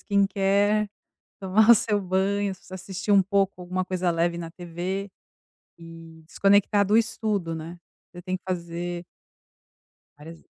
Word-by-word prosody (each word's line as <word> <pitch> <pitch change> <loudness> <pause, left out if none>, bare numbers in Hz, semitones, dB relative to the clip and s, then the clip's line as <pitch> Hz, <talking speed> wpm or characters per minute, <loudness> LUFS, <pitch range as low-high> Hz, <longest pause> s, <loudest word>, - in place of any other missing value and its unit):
Skin 200 -1 +2
Care 200 +2 +1 0.5
tomar 200 +4 +3
o - - +9
seu 210 -1 +1
banho, 195 +2 0 0.2
assistir 190 +2 -4
um 200 -1 +7
pouco 195 -1 0
alguma 185 +1 -2
coisa 185 -1 -1
leve 170 +1 0
na 165 -1 -6
TV 180 +3 -5 0.7
e 165 -1 -13
desconectar 200 +2 +3
do 210 +3 +3
estudo, 210 -7 -1
né? 165 +2 -8 0.3
Você 175 - -10
tem 185 +1 -3
que - - -41
fazer 175 -1 -4 1.1
várias 165 +3 -12
185 Hz, 135 wpm, -25 LUFS, 175-200 Hz, 1.1 s, o